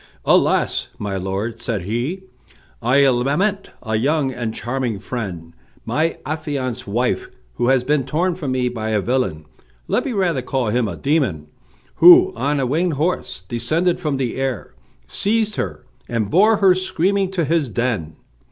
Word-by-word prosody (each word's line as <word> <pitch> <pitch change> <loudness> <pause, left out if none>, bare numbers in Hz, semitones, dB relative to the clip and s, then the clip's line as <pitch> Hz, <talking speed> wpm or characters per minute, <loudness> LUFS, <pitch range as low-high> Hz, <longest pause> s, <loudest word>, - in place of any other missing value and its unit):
"Alas! - - +2
my 100 -1 -4
lord," 100 +5 -3
said 110 -7 -2
he, 120 - -3 0.6
"I 130 +4 +4
lament 145 +11 +1
a 110 -2 -1
young 135 +2 +1
and 120 -3 -3
charming 120 -1 -3
friend, 95 -7 -6 0.3
my 160 +2 0
affianced 140 -6 -3
wife, 120 +5 -1 0.3
who 120 - +1
has 130 -1 +3
been 145 +1 +1
torn 175 +6 0
from 155 -6 -4
me 130 -1 0
by 110 -3 -3
a 110 -1 +1
villain, 95 -11 -1 0.4
let - - +1
me 260 - -3
rather 175 -9 +1
call 125 -2 -1
him 120 +1 +1
a - - -5
demon, 125 - 0 0.5
who, 360 +2 +8
on 145 0 0
a 135 - +1
winged 160 +7 0
horse, 150 - -2
descended 155 - 0
from 150 -6 -1
the 130 -3 -2
air, 135 -4 -3 0.3
seized 215 - 0
her, 80 -6 -4 0.2
and 110 -4 -1
bore 215 +6 +5
her 195 -2 +5
screaming 190 +1 0
to 180 -4 -1
his 160 -3 +1
den. 110 -11 -2
130 Hz, 160 wpm, -20 LUFS, 115-165 Hz, 0.6 s, who